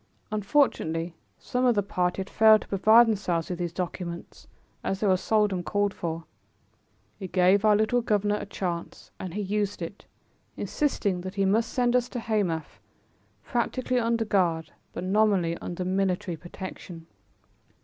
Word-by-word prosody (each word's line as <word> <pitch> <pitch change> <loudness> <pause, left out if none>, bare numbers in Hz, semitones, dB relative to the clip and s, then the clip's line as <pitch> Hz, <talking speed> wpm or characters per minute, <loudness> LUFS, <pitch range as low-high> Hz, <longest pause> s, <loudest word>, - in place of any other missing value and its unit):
Unfortunately 195 - +1 0.2
some 250 -1 -2
of 245 -2 +4
the 205 - +2
party 180 -1 -1
had 190 - -6
failed 220 -1 +6
to - - -19
provide 220 +4 +6
themselves 185 -6 -1
with 180 - -4
these 175 -1 -2
documents 175 -1 -6 0.4
as 195 - -2
they 215 - -1
were 190 -2 +4
seldom 205 -1 +1
called 205 +2 0
for. 165 -1 -4 1.0
It 190 -3 -7
gave 185 +2 +4
our 215 -1 +5
little 220 +3 +2
governor 210 -2 +1
a - - -6
chance 175 -4 -5
and 185 -1 -6
he 210 - -1
used 205 0 -1
it, 175 +4 -8 0.5
insisting 205 -11 -1
that 185 +2 -7
he 195 -1 +1
must 220 +4 +2
send 245 -1 +1
us 245 0 +2
to 245 - -4
Hamath, 180 - -2 0.6
practically 250 +1 -1
under 230 -1 0
guard, 170 -6 +1 0.2
but - - -6
nominally 190 -3 +2
under 180 +1 -5
military 185 -1 0
protection. 175 0 -9
195 Hz, 155 wpm, -27 LUFS, 180-215 Hz, 1.0 s, failed